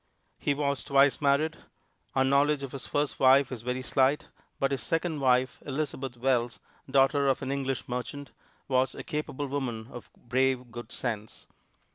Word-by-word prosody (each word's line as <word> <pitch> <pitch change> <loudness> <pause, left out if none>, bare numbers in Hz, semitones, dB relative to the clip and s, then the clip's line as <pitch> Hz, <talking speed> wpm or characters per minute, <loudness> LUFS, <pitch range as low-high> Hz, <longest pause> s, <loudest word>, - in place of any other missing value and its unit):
He 145 - +1
was 140 -1 -1
twice 140 +1 +4
married. 150 +3 +2 0.6
Our 135 - +4
knowledge 140 +1 +3
of 135 - -5
his 135 - -7
first 145 0 -1
wife 135 0 +5
is 125 -4 -5
very 125 +2 -3
slight, 135 +2 +2 0.3
but 135 0 +1
his 135 -3 -1
second 165 +1 -1
wife, 130 0 +2
Elizabeth 135 -3 -4
Wells, 120 -1 0 0.3
daughter 140 +1 +4
of 135 0 +1
an 135 - -2
English 135 -1 -2
merchant, 125 +3 -5 0.4
was 130 -1 +1
a - - -6
capable 150 -3 -3
woman 130 -5 -3
of 110 -6 -10
brave 130 0 0
good 120 0 -8
sense. 110 -3 -4
135 Hz, 160 wpm, -28 LUFS, 125-140 Hz, 0.6 s, wife